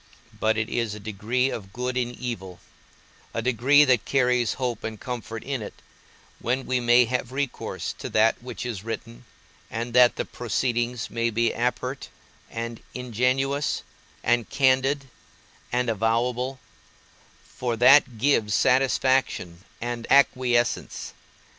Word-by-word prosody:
But 110 +1 +2
it 110 0 0
is 115 -3 -2
a - - -8
degree 110 +6 -1
of 95 -3 -7
good 125 +1 -3
in 125 -1 0
evil, 95 -8 -6 0.8
a 115 - 0
degree 130 +4 +5
that 125 -5 +3
carries 125 -3 +2
hope 125 -3 -3
and 110 -1 -5
comfort 115 -2 -6
in 135 -3 -3
it, 105 - -7 0.6
when 130 +3 -1
we 130 -1 0
may 120 0 +5
have 125 +1 -2
recourse 140 0 -3
to - - -5
that 110 +2 +3
which 125 0 -6
is 110 -6 -4
written, 115 +1 -7 0.4
and 115 +1 -4
that 125 0 +6
the - - -2
proceedings 120 0 -2
may 115 0 0
be 115 +1 +1
apert, 125 +3 -2 0.4
and 115 0 -5
ingenuous, 125 +4 0 0.4
and 120 -1 +1
candid, 135 +1 +2 0.6
and 125 0 0
avowable, 120 +4 0 0.9
for 120 -2 -3
that 125 0 +6
gives 110 -4 +2
satisfaction 130 -8 +2 0.2
and 120 0 -4
acquiescence. 125 -3 +2
120 Hz, 130 wpm, -25 LUFS, 115-130 Hz, 0.9 s, that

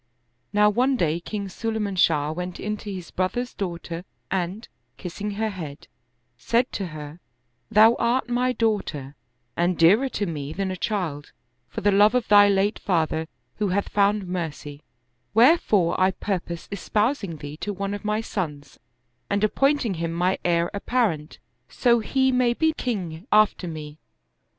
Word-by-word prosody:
Now 210 0 +4
one 255 +5 +2
day 165 -4 +1
King 200 +3 -5
Sulayman 210 0 -3
Shah 155 -4 +2
went 180 +2 -5
in 210 +1 -2
to 205 - -7
his 180 -3 -7
brother's 235 +7 -2
daughter 170 -2 -5 0.3
and, 190 +4 -2 0.3
kissing 195 +4 -5
her 220 +1 -1
head, 160 -7 -8 0.5
said 235 - +1
to 195 - -3
her, 155 0 -9 0.3
" 120 0 -47
Thou 220 +1 +7
art 240 +3 +1
my 245 +1 +1
daughter 205 - -1 0.4
and 175 +1 +1
dearer 205 +11 +5
to 205 - -2
me 150 -4 -5
than 195 +1 -2
a - - -3
child, 175 -8 -3 0.4
for - - -5
the 205 - +3
love 205 +4 +5
of 250 -3 +1
thy 205 -1 +7
late 200 +2 +1
father 160 -3 0 0.3
who 210 - 0
hath 195 +2 -1
found 205 0 +2
mercy; 160 -5 -5 0.5
wherefore 225 - +4
I 185 - +5
purpose 180 -3 -4
espousing 210 - -1
thee 145 0 -8
to 205 - -3
one 200 0 -3
of 205 - -6
my 210 +1 0
sons 150 -10 -5 0.5
and 200 +1 0
appointing 275 +1 +2
him 165 -1 -3
my 180 +2 +1
heir 170 -1 +1
apparent, 200 -8 -1 0.3
so 240 -2 +3
he 265 +4 +1
may 250 -1 +2
be 320 +3 +2
king 190 - -4
after 210 -3 +3
me. 155 -2 -7
195 Hz, 160 wpm, -24 LUFS, 170-220 Hz, 0.5 s, Thou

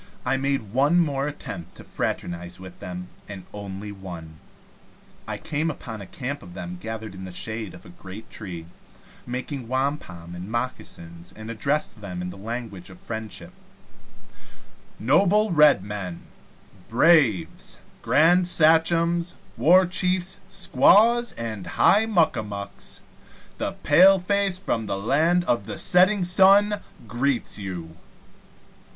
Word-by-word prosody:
I 125 - +2
made 135 -6 -1
one 145 +7 +4
more 140 -4 0
attempt 90 - -7
to - - -11
fraternize 85 +1 -4
with 95 -1 -11
them, 90 0 -7 0.2
and 95 -3 -8
only 100 0 -7
one. 85 -5 -9 0.9
I - - -4
came 160 0 -2
upon 115 -7 -7
a 95 - -9
camp 140 +3 -5
of 90 - -12
them 90 0 -7
gathered 110 0 -6
in 95 0 -9
the 95 - -7
shade 110 +2 -5
of 90 - -15
a - - -12
great 95 +4 -11
tree, 90 -6 -7 0.6
making 125 +1 -5
wampum 130 - -3
and 90 +3 -7
moccasins, 85 -8 -6
and 110 +1 -7
addressed 140 0 -1
them 90 -3 -6
in 90 - -4
the - - -10
language 105 -3 -6
of 95 - -13
friendship: 110 -3 -7 1.5
"Noble 190 - +3
Red 150 - +5
Men, 100 -4 -6 0.7
Braves, 115 - +3 0.2
Grand 175 +4 +4
Sachems, 170 +1 +3 0.2
War 185 +3 +5
Chiefs, 180 +1 0
Squaws, 225 +4 +4
and 110 -4 -6
High 215 +3 +5
Muck 175 -7 +3
a - - -1
Mucks, 100 -1 -8 0.6
the - - -2
paleface 195 +1 +4
from 115 - -2
the 100 -1 -2
land 160 - +2
of 120 - 0
the - - -5
setting 185 +2 +4
sun 200 +3 +5 0.3
greets 120 0 -1
you! 90 -5 -6
120 Hz, 135 wpm, -24 LUFS, -, 1.5 s, Red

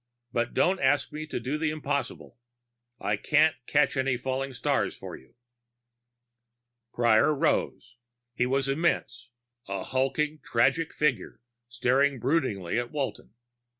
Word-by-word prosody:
But 120 -1 -1
don't 185 +1 +3
ask 140 +2 +2
me 155 +1 -6
to 150 - -3
do 135 +5 -3
the 160 -1 +1
impossible. 145 -5 -4 0.6
I 105 - 0
can't 150 +7 +3
catch 150 0 +2
any 130 -2 +1
falling 130 +2 -3
stars 125 - -1
for - - -8
you." 65 - -18 1.6
Prior 120 +5 +3
rose. 125 -3 -1 0.4
He 125 +1 0
was 135 +1 0
immense, 135 -5 -1 0.4
a 100 0 -3
hulking 135 +4 -1
tragic 155 +7 +1
figure 150 -5 -1 0.3
staring 130 +3 +2
broodingly 120 - 0
at 120 0 -4
Walton. 140 -6 -4
135 Hz, 125 wpm, -27 LUFS, 120-150 Hz, 1.6 s, don't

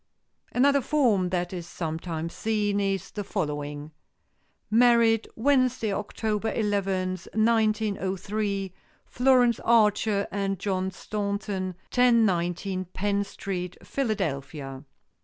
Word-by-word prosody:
Another 280 +2 +4
form 230 -11 +2
that 175 0 -2
is 175 -2 -5
sometimes 165 0 -4
seen 210 -2 0
is 195 -1 -1
the 205 - -4
following: 150 -5 -4 0.8
"Married, 230 -1 +4
Wednesday, 255 -4 +2
October 210 +1 -2
eleventh, 190 -4 -1
1903; 210 -3 0 0.3
Florence 245 -2 +3
Archer 210 -2 +3
and 195 -1 -1
John 190 0 -1
Staunton, 200 -1 -3 0.2
1019 195 -6 +2
Penn 200 +3 -1
Street, 185 -3 -5
Philadelphia." 145 - -3
200 Hz, 90 wpm, -26 LUFS, 185-220 Hz, 0.8 s, Another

